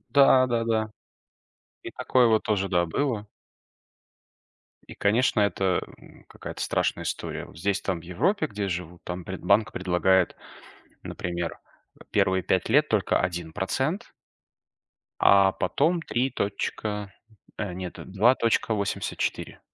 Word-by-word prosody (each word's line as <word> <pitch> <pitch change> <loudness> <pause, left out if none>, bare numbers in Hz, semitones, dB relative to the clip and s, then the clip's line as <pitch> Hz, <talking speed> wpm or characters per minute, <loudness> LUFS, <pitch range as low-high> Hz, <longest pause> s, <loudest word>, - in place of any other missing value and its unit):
Да-да-да, 120 -6 +4 0.9
и - - -7
такое 125 -2 +2
вот 110 -1 +3
тоже, 100 -2 0
да, 85 -2 +2
было. 110 - -2 1.6
И, - - -10
конечно, 110 +2 +2
это, 95 -2 +1 0.2
м, - - -18
какая-то - - -9
страшная - - 0
история. - - -4
Вот 80 - -15
здесь, 100 +3 0
там, 90 -4 -2
в - - -15
Европе, 190 - 0
где 105 -1 -4
я - - -2
живу, 85 -1 -5
там 90 -1 -5
пред 95 -1 -6
банк 105 +4 +3
предлагает, 90 0 +2 0.7
например, 85 -1 -4 0.4
э, - - -13
первые 95 -1 +2
5 95 +3 0
лет 150 +5 +4
только 105 -5 +1
1% 95 - -2 1.1
а 100 -1 +6
потом 165 - +1
3 125 +1 -1
точка, 105 0 -3 0.5
э, 100 -4 -3
нет 90 -1 -6 0.2
2,84. 110 -1 0
100 Hz, 120 wpm, -26 LUFS, 90-115 Hz, 1.6 s, а